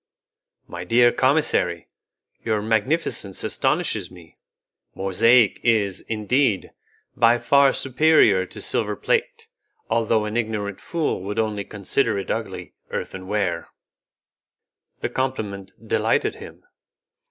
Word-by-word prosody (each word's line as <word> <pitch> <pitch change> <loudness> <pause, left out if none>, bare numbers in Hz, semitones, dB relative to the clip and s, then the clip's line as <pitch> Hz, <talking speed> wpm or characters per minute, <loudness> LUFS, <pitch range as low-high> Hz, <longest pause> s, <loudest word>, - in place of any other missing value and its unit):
"My 85 0 -7
dear 120 +5 +4
commissary, 130 - +1 0.6
your 110 -2 0
magnificence 110 - -1
astonishes - - -1
me; 85 -3 -16 0.6
mosaic 110 +4 +3
is, 100 -5 +2
indeed, 110 0 0 0.4
by 120 0 +4
far 140 +2 +4
superior 130 -9 +3
to - - -10
silver - - 0
plate, 470 -1 -1 0.4
although 110 -1 +1
an 105 +2 -3
ignorant 105 -4 -3
fool 165 - -2
would 100 +2 -5
only 105 -2 -1
consider 105 +3 -1
it 95 - -4
ugly - - -5 0.2
earthen 95 0 -6
ware." 95 -5 -1 1.3
The - - -1
compliment 105 -7 -3 0.2
delighted - - +1
him. - - -12
110 Hz, 105 wpm, -23 LUFS, 100-130 Hz, 1.3 s, dear